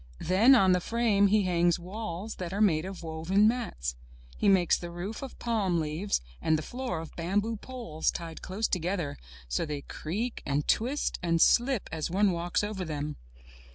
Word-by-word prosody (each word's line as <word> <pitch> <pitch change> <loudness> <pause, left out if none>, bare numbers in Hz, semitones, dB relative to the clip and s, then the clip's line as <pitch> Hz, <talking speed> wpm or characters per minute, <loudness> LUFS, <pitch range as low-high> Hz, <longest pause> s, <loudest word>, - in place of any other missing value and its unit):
Then 215 +10 +5
on 190 -6 +5
the 180 - +4
frame, 215 0 +2
he 210 +1 +3
hangs 175 -2 +2
walls 195 +2 -6
that 175 -2 -4
are 200 - -3
made 175 -6 +3
of 190 -2 -7
woven 165 +6 +2
mats. 220 - -2 0.4
He 205 - +2
makes 185 -3 +4
the 175 - -5
roof 175 +6 -5
of 270 -2 -8
palm 205 -7 0
leaves 160 +6 -1 0.2
and 160 - +3
the 155 - -4
floor 245 -2 -4
of 165 - -10
bamboo 205 +6 -1
poles 220 -10 -3
tied 165 -1 -5
close 205 +4 -2
together, 175 -4 -1 0.3
so - - -1
they 150 -2 -4
creak, 210 - -4
and 145 +1 -1
twist, 260 +6 +1
and 170 -2 +1
slip 240 +4 +4
as 160 -1 -2
one 195 +3 +3
walks 175 +3 -1
over 205 -3 -3
them. 150 -2 -4
185 Hz, 180 wpm, -29 LUFS, 165-215 Hz, 0.4 s, Then